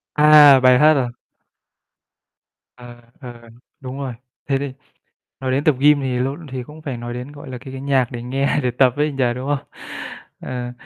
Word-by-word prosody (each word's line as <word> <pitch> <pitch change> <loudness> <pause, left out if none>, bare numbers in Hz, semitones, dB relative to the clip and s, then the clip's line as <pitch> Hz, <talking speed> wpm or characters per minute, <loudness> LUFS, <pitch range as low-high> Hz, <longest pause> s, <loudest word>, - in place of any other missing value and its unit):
À! 150 -2 +7
Bài 125 -1 +5
hát 155 +1 +6
à? 125 -3 0 1.7
À, 120 -1 -13 0.2
ừ, 125 -3 -8 0.5
đúng 130 +1 -8
rồi. 135 -3 -5 0.3
Thế 135 -1 +1
thì 140 -1 -5 0.7
nói 130 -1 -2
đến 135 +3 0
tập 155 - +4
gym 145 +1 +4
thì 130 -2 -2
lộn 140 +6 -3
thì 130 -1 -5
cũng 150 +5 -13
phải 135 -5 -5
nói 120 0 -7
đến, 125 +4 -7
gọi 145 -2 -11
là, 125 - -6
cái 130 +2 -11
cái 135 - -7
nhạc 135 -2 +1
để 120 -2 -7
nghe 135 +4 -1
để 125 - 0
tập 125 +1 +3
ấy 150 +1 0
nhỉ, 135 -2 0
đúng 130 +2 -5
không? 145 -2 -2 0.7
Ờ. 125 -1 -6
135 Hz, 195 wpm, -20 LUFS, 125-145 Hz, 1.7 s, À